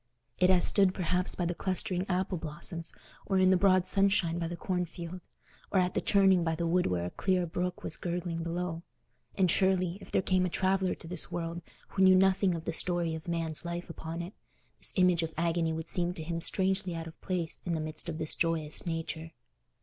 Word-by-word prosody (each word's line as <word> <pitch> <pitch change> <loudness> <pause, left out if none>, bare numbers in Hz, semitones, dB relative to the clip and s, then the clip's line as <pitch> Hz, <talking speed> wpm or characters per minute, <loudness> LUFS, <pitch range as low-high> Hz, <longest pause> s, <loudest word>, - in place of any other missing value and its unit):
It 180 - +4
has 180 -2 +5
stood 195 -2 +5
perhaps 180 0 -1
by 175 - -1
the 175 - -1
clustering 185 0 -1
apple 185 -1 -1
blossoms, 165 +2 -4 0.4
or 195 - +1
in 185 0 +5
the - - +5
broad 185 -1 +4
sunshine 195 -3 +3
by 165 - -2
the 175 - -5
cornfield, 180 -1 -4 0.5
or 190 - +2
at 180 0 0
a - - +1
turning 190 -3 +4
by 165 -1 0
the 170 +1 -2
wood 180 +2 +2
where 90 -1 -1
a 90 - -4
clear 185 -2 0
brook 180 +2 -3
was - - -2
gurgling 175 -1 -3
below; 170 0 -3 0.5
and 185 -3 +3
surely, 190 -1 +2
if - - -12
there - - +2
came 185 0 +2
a 180 - 0
traveller 190 +1 +1
to 165 - -11
this 175 0 -2
world 170 0 -4 0.3
who 190 - -2
knew 185 0 +7
nothing 190 -1 +3
of 165 0 -6
the 170 - -2
story 175 -1 -1
of 160 +1 -7
man's 165 -2 -1
life 170 0 -5
upon 165 +1 -6
it, 180 +4 -8 0.5
this - - +3
image 180 -3 +4
of 165 -1 -4
agony 165 0 +1
would 160 0 -4
seem 175 0 +1
to 160 - -6
him 165 +1 -3
strangely 190 0 0
out 165 0 -5
of 165 - -12
place 175 -3 -2
in 170 -2 -1
the - - -2
midst 155 +2 -3
of 160 - -4
this 155 -1 -2
joyous 165 -1 -1
nature. 165 0 -4
175 Hz, 215 wpm, -30 LUFS, 165-185 Hz, 0.5 s, knew